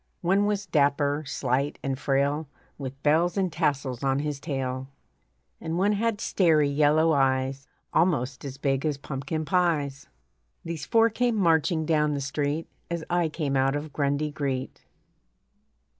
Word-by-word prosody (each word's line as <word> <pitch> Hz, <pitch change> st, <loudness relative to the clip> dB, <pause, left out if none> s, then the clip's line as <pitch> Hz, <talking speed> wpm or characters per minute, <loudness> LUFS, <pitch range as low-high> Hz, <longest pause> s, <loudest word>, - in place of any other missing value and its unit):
One 195 Hz, +4 st, +2 dB
was 205 Hz, -1 st, -1 dB
dapper, 145 Hz, -2 st, +1 dB
slight, 135 Hz, +3 st, -1 dB
and 135 Hz, -1 st, -2 dB
frail, 140 Hz, +3 st, 0 dB, 0.3 s
With 135 Hz, 0 st, -7 dB
bells 165 Hz, +5 st, +3 dB
and 185 Hz, -4 st, 0 dB
tassels 140 Hz, -6 st, -1 dB
on 135 Hz, -1 st, +2 dB
his 145 Hz, -1 st, -2 dB
tail, 130 Hz, -3 st, -3 dB, 0.7 s
And 160 Hz, +1 st, -3 dB
one 200 Hz, +3 st, +3 dB
had 215 Hz, 0 st, 0 dB
starey 155 Hz, -6 st, +3 dB
yellow 150 Hz, +3 st, +4 dB
eyes 135 Hz, 0 st, +1 dB, 0.3 s
Almost 140 Hz, -7 st, +1 dB
as 135 Hz, -1 st, -6 dB
big 135 Hz, -1 st, 0 dB
as 150 Hz, -3 st, 0 dB
pumpkin 140 Hz, +3 st, -4 dB
pies. 150 Hz, -5 st, 0 dB, 0.6 s
These 165 Hz, -4 st, -5 dB
four 230 Hz, -1 st, +4 dB
came 240 Hz, +1 st, +1 dB
marching 165 Hz, -3 st, +2 dB
down 150 Hz, -2 st, +2 dB
the -, -, -2 dB
street 145 Hz, +3 st, -2 dB, 0.2 s
As 170 Hz, -1 st, -3 dB
I 175 Hz, -2 st, +2 dB
came 150 Hz, -3 st, -2 dB
out 135 Hz, +1 st, +2 dB
of 145 Hz, 0 st, -5 dB
Grundy 145 Hz, +1 st, 0 dB
Greet. 135 Hz, -3 st, -3 dB
145 Hz, 145 wpm, -26 LUFS, 140-165 Hz, 0.7 s, yellow